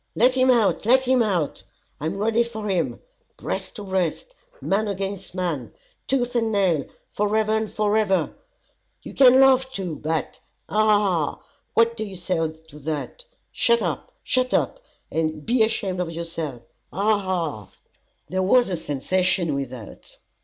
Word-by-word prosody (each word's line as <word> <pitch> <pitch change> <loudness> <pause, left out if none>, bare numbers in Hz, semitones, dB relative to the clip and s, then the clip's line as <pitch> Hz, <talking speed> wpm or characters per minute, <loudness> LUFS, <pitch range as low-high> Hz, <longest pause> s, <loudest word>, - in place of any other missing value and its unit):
Let 250 +3 +4
him 260 0 +3
out, 235 -5 +3
let 255 +5 +5
him 260 -1 +2
out! 180 -9 0 0.4
I 150 - -2
am 185 +5 -3
ready 225 +3 +2
for 220 -2 -6
him, 185 -4 -1 0.4
breast - - -4
to 210 - -7
breast, 190 - -2 0.3
man 210 - 0
against 195 -1 -4
man, 165 -10 -3 0.3
tooth 245 -2 0
and 225 -2 +1
nail, 185 -9 +2 0.3
forever 215 +1 +1
and 220 -1 0
forever. 210 -2 +1 0.7
You - - -9
can 260 -1 +7
laugh 265 -1 +5
too, 180 - -4
but 160 +2 -3 0.3
Ha! - - -8
Ha! 215 -1 +5 0.4
Ha! - - -28 0.3
what 230 0 +4
do 220 - -3
you 200 -3 -7
say 175 -3 -1
to 160 -1 -16
that? 155 - -5 0.3
Shut 470 0 +3
up, - - -3
shut 255 0 +1
up, - - 0 0.3
and 155 -2 -2
be 240 0 +2
ashamed 205 -4 +1
of 180 -2 -1
yourself. 165 -6 -5 0.3
Ha! 185 - -7 0.2
Ha! 170 - -2
Ha!" - - -30 0.6
There 185 +5 -1
was 225 +3 +4
a 180 - 0
sensation 175 +3 0
without. 130 -5 -7
195 Hz, 160 wpm, -23 LUFS, 165-225 Hz, 0.7 s, can